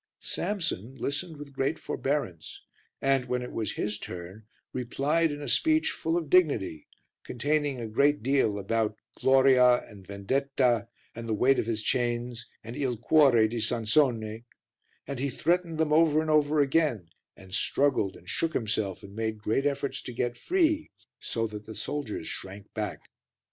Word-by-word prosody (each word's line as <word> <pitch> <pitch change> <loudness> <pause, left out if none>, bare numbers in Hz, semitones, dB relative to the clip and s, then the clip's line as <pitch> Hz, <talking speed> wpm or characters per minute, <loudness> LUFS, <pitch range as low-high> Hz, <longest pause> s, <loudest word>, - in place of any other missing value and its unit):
Samson 165 - -3
listened 145 +6 -3
with 145 -1 -10
great 135 +4 0
forbearance 125 - -3 0.4
and, 135 -2 +2
when 125 0 -1
it 125 - -7
was 110 -2 -2
his 105 0 -3
turn, 90 +5 -8 0.3
replied 140 +6 +1
in 145 0 -6
a - - -5
speech 315 - +2
full 165 +1 -1
of 165 -3 -2
dignity, 140 - +2 0.4
containing 145 +1 -1
a 115 - -4
great 140 +5 +2
deal 130 -6 +2
about 110 +1 -1 0.2
gloria 130 -2 +5
and 100 -4 -14
vendetta 120 +2 0 0.3
and 115 0 -7
the 110 - +1
weight 135 +5 +4
of - - -1
his 110 -2 -1
chains 120 0 -1 0.2
and 115 +2 -7
il 130 -4 -1
cuore 125 -3 +5
di 115 +2 -3
Sansone, 115 -1 +1 0.6
and 140 -2 -5
he 140 +2 0
threatened 170 +4 0
them 155 -1 +1
over 155 -1 +5
and 155 0 0
over 150 0 +4
again, 135 - +1 0.3
and 95 -1 -13
struggled 105 -2 +1
and - - -16
shook 165 -1 -1
himself 105 -4 -1
and 100 0 -11
made 110 0 -2
great 110 +6 0
efforts 140 -1 -2
to 125 - -7
get 120 +1 -1
free, 320 - +1 0.3
so 115 -1 -2
that 105 -1 -7
the 110 - -8
soldiers 110 - -4
shrank 95 +1 -7
back. 105 -2 -4
125 Hz, 160 wpm, -28 LUFS, 110-145 Hz, 0.6 s, gloria